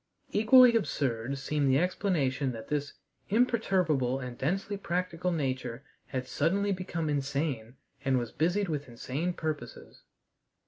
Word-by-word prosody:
Equally 240 +3 +7
absurd 135 - -1
seemed 145 0 0
the 130 - +4
explanation 145 -7 0
that 115 -1 -9
this 145 -1 -2 0.4
imperturbable 185 - +2
and 125 -2 -6
densely 195 +10 -1
practical 180 -2 -2
nature 130 -5 -2 0.2
had 130 -1 -3
suddenly 195 +9 +1
become 180 -4 -2
insane 140 -4 -2 0.3
and 135 -2 +2
was 120 -2 -2
busied 180 +5 +1
with 150 -4 -3
insane 135 +8 -3
purposes. 155 -3 -6
150 Hz, 125 wpm, -30 LUFS, 130-185 Hz, 0.4 s, Equally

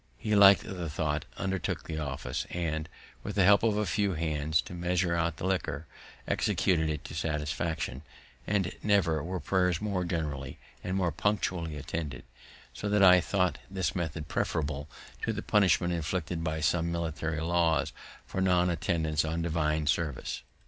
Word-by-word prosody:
He 105 - 0
liked 100 -1 +8
the 90 -3 -5
tho't, 75 -1 -1
undertook 95 -2 -2
the 80 -1 -4
office, 65 -4 -3
and, 80 -2 -2 0.3
with - - -5
the 100 - +4
help 100 +2 +6
of 110 -2 +2
a 105 - +1
few 100 +1 +1
hands 80 -1 0
to - - -9
measure 90 0 0
out 85 -1 0
the 85 - -4
liquor, 80 -5 -1 0.4
executed 80 -4 +1
it 75 -1 -3
to - - -7
satisfaction, 75 -2 -2 0.5
and 95 -3 +1
never 90 -7 +2
were 90 +2 -3
prayers 90 +1 +1
more 100 -4 -1
generally 75 -6 -3 0.3
and 95 +1 -1
more 90 -3 +1
punctually 90 -3 -1
attended; 75 -2 -4 0.5
so 105 +10 -4
that 105 -1 +4
I 90 -1 +8
thought 90 0 0
this 95 -4 -1
method 80 -3 -3
preferable 75 -2 -2 0.3
to - - -1
the - - -4
punishment 95 -3 +3
inflicted 85 0 -2
by 80 -1 -2
some 85 +2 +1
military 80 -1 -2
laws 85 -1 +1 0.3
for 95 - -3
non 90 -1 +3
attendance 80 -3 0
on 80 +1 -2
divine 80 -2 0
service. 75 -2 -1
85 Hz, 160 wpm, -30 LUFS, 80-90 Hz, 0.5 s, liked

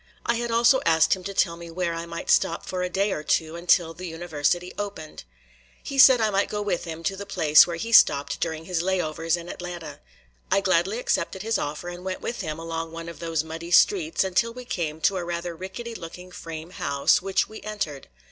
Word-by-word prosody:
I 235 - +1
had 240 0 -3
also 235 +3 +4
asked 160 0 +4
him 185 - -11
to 200 - -4
tell 170 -3 +2
me 170 0 -9
where 170 0 -2
I 165 0 -5
might 170 0 -3
stop 165 - +2
for 185 -1 -3
a 180 - -1
day 195 +3 0
or 150 - -2
two 160 +1 0
until 170 -1 +2
the 180 +2 -7
University 170 +1 -1
opened. 195 - -7 0.6
He 275 - -4
said 260 -2 +9
I 220 -1 +2
might 200 0 +1
go 210 - -3
with 200 -4 -2
him 165 0 -7
to 195 - -1
the 200 +1 -8
place 155 -6 +6
where 170 - -3
he 230 +7 -5
stopped 140 -10 +5
during 160 -1 -3
his 175 -1 -1
"lay 190 +1 0
overs" 165 0 -1
in 170 0 -9
Atlanta. 175 -2 -7 0.5
I - - +4
gladly 185 +2 +1
accepted 200 -5 -1
his 225 0 0
offer 150 +4 -4
and 175 0 -7
went 185 0 -4
with 235 - -4
him 155 -4 -4
along 165 0 -5
one 165 0 -7
of 170 - -10
those 165 -2 -1
muddy 165 +1 -7
streets 335 - +4
until 190 +5 +1
we 250 +1 -10
came 160 -7 -3
to 195 - +2
a 180 - -3
rather 170 0 -4
rickety 190 +7 -7
looking 180 -1 -9
frame 165 -1 -8
house, 140 -4 +2
which 195 0 0
we 220 - -10
entered. 200 -10 -5
175 Hz, 225 wpm, -25 LUFS, 165-195 Hz, 0.6 s, said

